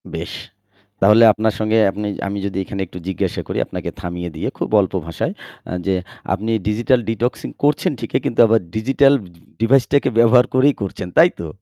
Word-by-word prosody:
বেশ। - - -5 0.7
তাহলে 105 +4 +6
আপনার 110 0 0
সঙ্গে 110 +1 +1
আপনি 105 +2 -4 0.2
আমি 100 +1 -4
যদি 100 -1 -4
এখানে 95 +1 -5
একটু 90 - -11
জিজ্ঞাসা 95 -3 -2
করি - - -4
আপনাকে - - -5
থামিয়ে 90 0 -5
দিয়ে 80 - -3
খুব - - -3
অল্প 95 - -3
ভাষায় 85 -2 -3 0.4
আ - - -5
যে, 95 - +1 0.4
আপনি 105 +4 -3 0.2
digital 120 +4 +2
detoxing 115 +2 -2
করছেন 150 +5 +2
ঠিকই 115 - -2
কিন্তু 115 - -2
আবার 115 +1 +3 0.2
digital 135 +5 +3 0.5
device 125 +2 +3
টাকে 140 - +3
ব্যবহার 120 +2 +6
করেই 135 +2 +4
করছেন, 95 -2 -5
তাই 170 +2 +7
তো? 85 - -5
110 Hz, 175 wpm, -19 LUFS, 100-125 Hz, 0.7 s, তাই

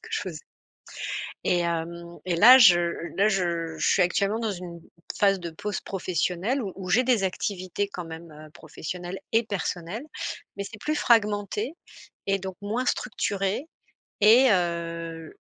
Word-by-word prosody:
que 455 - -12
je 440 - 0
faisais - - -6 1.0
et 180 - +2
hem, 170 0 -3
et 180 -2 0
là 245 +9 +10
je 190 -9 +8 0.4
là 200 +2 +4
je 170 -4 -1
je - - 0
suis 190 - +4
actuellement 200 +5 +1
dans 220 -2 -1
une 175 -2 -8 0.4
phase 195 -2 +3
de 170 - -5
pause 205 +5 -4
professionnelle 185 - -1
où 195 - -4
où 185 -1 -7
j'ai 245 +5 +4
des 235 -6 +2
activités 185 +1 -2
quand 180 -3 -6
même 165 +1 -9 0.3
professionnelles 175 +3 -7
et 225 +1 +4
personnelles, 200 - -4 0.5
mais 200 - -3
c'est 210 +1 -9
plus 305 +8 -1
fragmenté 210 +3 +1 0.5
et 195 0 +2
donc 190 -1 -6
moins 230 +5 -2
structuré 205 +1 -1 0.6
et 235 +5 +7
heu, 170 -2 -2
190 Hz, 150 wpm, -26 LUFS, 170-210 Hz, 1.0 s, là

